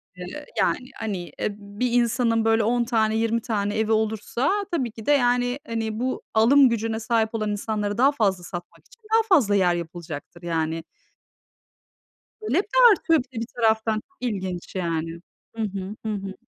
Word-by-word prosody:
eee, 180 +12 -8
yani. 255 +1 0
Hani, 215 -4 -2 0.2
eee, - - 0
bir 205 +5 -3
insanın, 235 -1 +2
böyle, 225 0 +3
10 240 +2 +2
tane, 220 -2 +1
20 230 +1 +1
tane 210 -2 -1
evi 220 0 +1
olursa 220 - 0 0.2
tabii 260 -9 -1
ki 220 -1 -11
de 290 - +3
yani, 245 -1 +2
hani, 225 -1 -3
bu 255 +1 -2
alım 255 +4 +6
gücüne 225 -1 -1
sahip 225 -1 +1
olan 215 -1 -1
insanları 205 0 -2
daha 270 +3 +5
fazla 195 -9 0
satmak 175 0 -9
için - - -21
daha 450 - +6
fazla 230 - +4
yer 180 -3 +3
yapılacaktır, 170 -1 -7
yani 165 -1 -1 1.6
Talep 395 -2 +1
de - - +2
artıyor 330 -5 +2
bir 255 -1 -11
de - - -2
bir 230 - -3
taraftan. 220 -1 +2
Çok 365 +12 -8
ilginç, 190 -8 -4
yani 165 -2 -2 0.4
Hı 225 - -2
hı. 200 0 -4
Hı 215 - -1
hı. 195 -1 -5
220 Hz, 170 wpm, -24 LUFS, 200-245 Hz, 1.6 s, alım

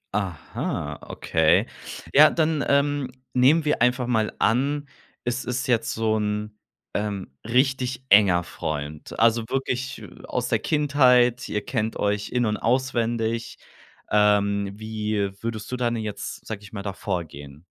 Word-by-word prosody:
Aha, 80 -5 -3
okay. - - +2 0.5
Ja, 150 +2 +8
dann, 155 -3 +1
ähm, 140 -1 +2 0.2
nehmen 145 +6 +4
wir 150 - +1
einfach 125 +1 +3
mal 110 -3 +1
an, 140 +5 +1 0.4
es 120 +2 -2
ist 125 +3 -2
jetzt 115 -3 +1
so 110 -1 0
'n, 105 0 -2 0.4
ähm, 100 -7 -3
richtig 130 +1 0
enger 95 -4 +6
Freund. 75 -2 -5
Also, 115 0 +4
wirklich, 130 -1 -2
äh, - - -10 0.2
aus - - -2
der - - +2
Kindheit. 125 -5 +3
Ihr 105 -1 -2
kennt 110 -3 -2
euch 105 0 -1
in 125 -1 +1
und 105 -1 0
auswendig. 115 -2 -1 0.5
Ähm, 100 -1 +3
wie 105 -2 -2
würdest 115 -1 -5
du 125 - -2
dann 120 -1 0
jetzt, 110 -2 -5
sage 110 -2 -6
ich 100 - -13
mal, 100 -2 -5
da 100 -1 -3
vorgehen? 80 -6 -6
115 Hz, 140 wpm, -24 LUFS, 105-125 Hz, 0.5 s, Ja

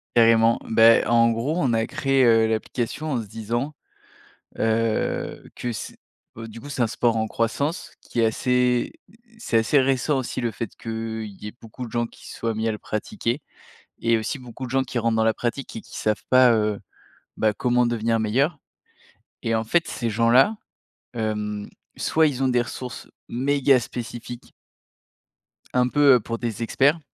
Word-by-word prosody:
Carrément. 115 0 +5
Bah, 115 0 +6
en 115 0 +5
gros 120 +8 -1
on 130 -7 +1
a 115 0 +1
créé, 135 -3 +1
heu, 115 -1 +5
l'application 120 +7 -2
en 120 - 0
se - - -8
disant, 115 +7 -3 0.8
heu, 110 0 0
que 120 -1 -4
c 105 - -7 0.4
heu, 115 0 -7
du 115 +1 -10
coup, 145 - -9
c'est 135 -3 -3
un 115 - +3
sport 115 0 +1
en 110 - 0
croissance 140 - -2
qui 120 - -3
est - - +4
assez, 125 +2 +1 0.4
c'est 220 - 0
assez 115 +6 +3
récent 135 +2 +1
aussi 130 0 -3
le 120 -2 -1
fait 115 -1 -5
qu’il 110 -1 -4 0.2
y - - -4
ait 105 - -8
beaucoup 115 +3 -8
de 115 - -10
gens 120 0 0
qui - - -15
se - - -9
soient 115 -1 -2
mis 110 +1 0
à - - +1
le 105 - -4
pratiquer. 120 - -3 0.6
Et 115 -1 +3
aussi 110 +6 -3
beaucoup 125 0 -8
de - - -10
gens 135 +1 +1
qui 125 -1 -3
rentrent 115 -1 +1
dans 110 - +2
la 110 - +3
pratique 120 +4 -4
et 110 - -5
qui - - -11
savent 105 -2 -1
pas, 130 -1 +6
heu, 105 -2 0 0.6
bah 110 -1 +2
comment 125 +3 +2
devenir 115 -1 0
meilleurs. 135 +8 +1 0.8
Et 115 0 0
en 110 - 0
fait, 165 +10 +1
ces 120 -3 -3
gens-là, 120 - +4 0.6
hem, 105 -2 -3 0.3
soit 160 0 +3
ils 135 -2 -2
ont - - +3
des 125 -1 +3
ressources 125 +1 -7 0.2
méga 135 +1 +3
spécifiques 120 0 -7 1.2
un 125 0 +4
peu 145 0 +5
heu, - - +3
pour 115 +1 -4
des 115 -2 -4
experts 140 +7 +2
115 Hz, 185 wpm, -24 LUFS, 115-130 Hz, 1.2 s, Bah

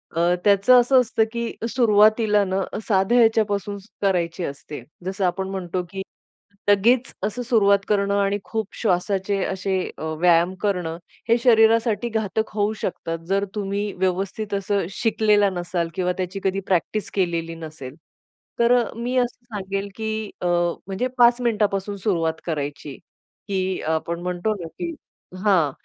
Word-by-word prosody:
अ, 170 +2 +3
त्याचं 205 +5 +6
असं 255 +2 +4
असतं, 225 -2 +1
की 235 -1 -3 0.2
सुरुवातीला 215 -2 +4
न, 190 +1 -1 0.3
साध्या 195 +3 +3
ह्याच्यापासून 205 -3 +2 0.2
करायची 180 -3 0
असते. 145 0 -7 0.2
जसं 190 +1 -1
आपण 190 +2 -1
म्हणतो, 185 -1 -3
की 195 - -5 0.7
लगेच 235 +6 +4
असं 215 +4 -2
सुरुवात 200 -4 +4
करणं 200 -1 +1
आणि 200 0 +1
खूप 220 -3 -3
श्वासाचे 195 0 0
असे 190 0 -2 0.2
अ, - - -7 0.2
व्यायाम 175 +1 +4
करणं, 180 -5 -1 0.3
हे 230 - +5
शरीरासाठी 230 -1 +4
घातक 220 0 -1
होऊ 210 +1 +1
शकतात. 165 -2 -3
जर 195 +1 +2
तुम्ही 205 0 -2
व्यवस्थित 190 +3 -2
असं 200 -2 0
शिकलेला 210 -2 +2
नसाल 175 -1 -2
किंवा 180 -1 0
त्याची 185 +1 -3
कधी 195 0 0
प्रॅक्टिस 195 +3 0
केलेली 170 -3 -1
नसेल. 155 -5 -9 0.6
तर 235 +1 +5 0.2
मी 240 +2 -3
असं 245 0 -1
सांगेल, 195 -2 -4
की 220 -1 -3
अ, 180 - 0 0.4
म्हणजे 200 +6 -1
5 240 0 +5
मिनिटापासून 205 -4 0
सुरुवात 165 -5 -1
करायची, 145 -3 -4 0.5
की 190 -2 -1
आपण 170 +1 -3
म्हणतो 180 +4 -1
ना - - -5
की 335 - -6 0.5
हां, 170 -8 +4
200 Hz, 140 wpm, -23 LUFS, 180-220 Hz, 0.7 s, त्याचं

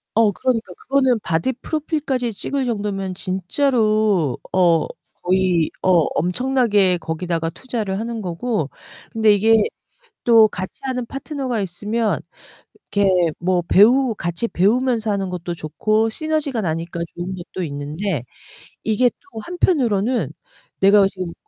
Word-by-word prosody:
어 220 -2 +4
그러니까. 225 -4 -1
그거는 260 -3 +2
바디 170 +10 0
프로필까지 285 -4 -2
찍을 270 +6 -2
정도면 200 -5 -2
진짜로 215 - +1
어 175 -3 +3 0.4
거의 180 -3 +2
어 185 - +1 0.3
엄청나게 205 -1 +2
거기다가 165 0 -2
투자를 210 0 -4
하는 230 0 -4
거고 180 - -2 0.4
근데 220 -2 +4
이게 220 +2 +4 0.7
또 225 -2 +7
같이하는 250 +7 -4
파트너가 270 -3 -3
있으면 210 +5 -1 0.7
이렇게 200 -1 +3 0.3
뭐 180 +1 +1
배우 240 +4 +5
같이 175 +5 -2
배우면서 225 +3 +1
하는 195 -2 -1
것도 175 -1 -4
좋고, 215 +8 0
시너지가 300 -2 -1
나니까 170 -1 -3
좋은 175 +2 -4
것도 180 +1 -6
있는데 150 - -3 0.6
이게 225 +3 +3
또 370 -2 -12
한편으로는 250 - +1 0.5
내가 200 +1 +6
어 195 - +5
지금 185 -3 -6
210 Hz, 290 characters per minute, -21 LUFS, 180-245 Hz, 0.7 s, 또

